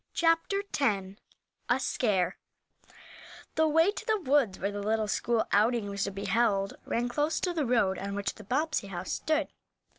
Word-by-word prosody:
CHAPTER 330 Hz, +4 st, +2 dB, 0.2 s
X 195 Hz, -7 st, 0 dB, 0.5 s
A -, -, +3 dB
SCARE 195 Hz, -8 st, 0 dB, 1.2 s
THE 315 Hz, 0 st, +3 dB
way 325 Hz, +5 st, +4 dB
to 435 Hz, -, -8 dB
the 435 Hz, -1 st, +2 dB
woods 270 Hz, -, +2 dB
where 200 Hz, +2 st, -2 dB
the 205 Hz, 0 st, -4 dB
little 215 Hz, +1 st, 0 dB
school 230 Hz, +2 st, 0 dB
outing 215 Hz, 0 st, +2 dB
was 200 Hz, -1 st, -1 dB
to 200 Hz, -, -3 dB
be 200 Hz, +1 st, -6 dB
held 200 Hz, -1 st, +1 dB
ran 240 Hz, +1 st, 0 dB
close 295 Hz, +5 st, 0 dB
to 360 Hz, -, 0 dB
the 310 Hz, -6 st, -1 dB
road 215 Hz, -6 st, +2 dB
on 200 Hz, 0 st, -4 dB
which 200 Hz, -1 st, -2 dB
the 215 Hz, -, -12 dB
Bobbsey 285 Hz, +1 st, -1 dB
house 190 Hz, -1 st, -5 dB
stood. 310 Hz, -1 st, 0 dB
230 Hz, 175 wpm, -29 LUFS, 200-300 Hz, 1.2 s, way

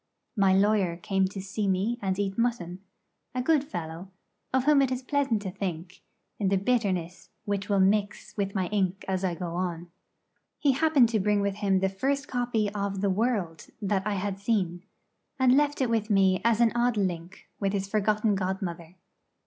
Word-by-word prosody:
My 195 Hz, -3 st, +4 dB
lawyer 195 Hz, -3 st, +2 dB
came 195 Hz, +2 st, 0 dB
to 195 Hz, +1 st, -7 dB
see 195 Hz, +2 st, -3 dB
me 195 Hz, +6 st, 0 dB
and 190 Hz, -2 st, -1 dB
eat 195 Hz, -1 st, -1 dB
mutton 210 Hz, -7 st, -1 dB, 0.5 s
a 250 Hz, -, 0 dB
good 300 Hz, 0 st, +3 dB
fellow, 175 Hz, -, -6 dB, 0.4 s
of 260 Hz, -1 st, +2 dB
whom 290 Hz, 0 st, +5 dB
it 265 Hz, -2 st, +1 dB
is 255 Hz, 0 st, -2 dB
pleasant 265 Hz, -6 st, 0 dB
to 190 Hz, -, -4 dB
think, 180 Hz, -2 st, -5 dB, 0.4 s
in 200 Hz, -3 st, +1 dB
the 195 Hz, -, +2 dB
bitterness 190 Hz, -5 st, -1 dB, 0.2 s
which 200 Hz, -1 st, -2 dB
will 200 Hz, -1 st, +3 dB
mix 200 Hz, +2 st, +1 dB
with 200 Hz, -1 st, -2 dB
my 190 Hz, -2 st, +1 dB
ink 195 Hz, -2 st, -1 dB
as 190 Hz, 0 st, -1 dB
I 180 Hz, -2 st, 0 dB
go 175 Hz, -1 st, -5 dB
on. 175 Hz, -1 st, -3 dB, 0.7 s
He 285 Hz, -, +3 dB
happened 280 Hz, -3 st, +4 dB
to 225 Hz, -2 st, +1 dB
bring 205 Hz, +1 st, +2 dB
with 200 Hz, 0 st, -1 dB
him 195 Hz, -2 st, +1 dB
the 195 Hz, -, +3 dB
first 275 Hz, +9 st, -1 dB
copy 245 Hz, -4 st, 0 dB
of 200 Hz, -2 st, -2 dB
the 200 Hz, -1 st, +2 dB
'World' 200 Hz, -6 st, -1 dB
that 200 Hz, -2 st, 0 dB
I 210 Hz, -, 0 dB
had 195 Hz, 0 st, -3 dB
seen, 190 Hz, -5 st, 0 dB, 0.6 s
and 260 Hz, -1 st, +4 dB
left 290 Hz, 0 st, +2 dB
it 255 Hz, -, +1 dB
with 225 Hz, -1 st, 0 dB
me 195 Hz, -2 st, +3 dB
as 230 Hz, 0 st, +3 dB
an 230 Hz, -1 st, +5 dB
odd 240 Hz, -1 st, +1 dB
link 180 Hz, -2 st, -3 dB
with 195 Hz, 0 st, 0 dB
its 195 Hz, 0 st, -2 dB
forgotten 210 Hz, +1 st, +1 dB
godmother. 185 Hz, -3 st, -3 dB
200 Hz, 190 wpm, -27 LUFS, 190-230 Hz, 0.7 s, whom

